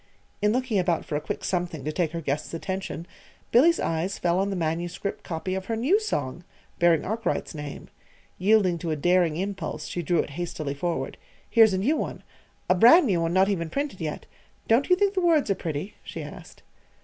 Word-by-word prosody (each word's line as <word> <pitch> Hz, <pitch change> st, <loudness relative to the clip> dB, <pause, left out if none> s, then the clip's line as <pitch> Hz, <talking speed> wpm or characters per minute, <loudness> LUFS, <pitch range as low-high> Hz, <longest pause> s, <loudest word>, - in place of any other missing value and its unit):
in 210 Hz, 0 st, +3 dB
looking 250 Hz, -3 st, 0 dB
about 175 Hz, -3 st, 0 dB
for 150 Hz, -, -4 dB
a 150 Hz, -, -1 dB
quick -, -, -5 dB
something 175 Hz, -6 st, -2 dB
to 155 Hz, -, -1 dB
take 165 Hz, -1 st, 0 dB
her 170 Hz, 0 st, -4 dB
guest's 145 Hz, +2 st, -3 dB
attention, 190 Hz, -1 st, -4 dB, 0.5 s
Billy's 330 Hz, +8 st, +5 dB
eyes 165 Hz, +4 st, -1 dB
fell 175 Hz, +1 st, +1 dB
on 195 Hz, +1 st, +1 dB
the 195 Hz, -, -2 dB
manuscript 175 Hz, +3 st, -3 dB
copy 175 Hz, +2 st, -4 dB
of 190 Hz, 0 st, -3 dB
her 225 Hz, -, -1 dB
new 280 Hz, -, +3 dB
song, 165 Hz, -, -3 dB, 0.4 s
bearing 170 Hz, -2 st, +4 dB
Arkwright's 220 Hz, -1 st, -2 dB
name. 150 Hz, -2 st, -7 dB, 0.5 s
Yielding 190 Hz, -3 st, +3 dB
to 165 Hz, -, -4 dB
a 155 Hz, -, 0 dB
daring 175 Hz, +1 st, +2 dB
impulse, 185 Hz, -5 st, -4 dB
she 175 Hz, -, -3 dB
drew 170 Hz, +1 st, +1 dB
it -, -, 0 dB
hastily 155 Hz, -2 st, -4 dB
forward. 170 Hz, +4 st, -3 dB, 0.3 s
"Here's 225 Hz, -3 st, +5 dB
a -, -, 0 dB
new 250 Hz, +12 st, +2 dB
one -, -, -4 dB, 0.4 s
a -, -, +5 dB
brand 240 Hz, -, +7 dB
new 185 Hz, -8 st, +1 dB
one, 165 Hz, 0 st, 0 dB
not 190 Hz, +1 st, +4 dB
even 170 Hz, -5 st, -1 dB
printed 280 Hz, -, -3 dB
yet. 155 Hz, -2 st, -4 dB, 0.4 s
Don't 235 Hz, +5 st, +3 dB
you 360 Hz, -, +7 dB
think 400 Hz, +1 st, +2 dB
the 375 Hz, -, 0 dB
words 320 Hz, -, +3 dB
are -, -, +5 dB
pretty?" 165 Hz, +1 st, -4 dB
she -, -, -7 dB
asked. -, -, -11 dB
180 Hz, 200 wpm, -26 LUFS, 165-220 Hz, 0.5 s, brand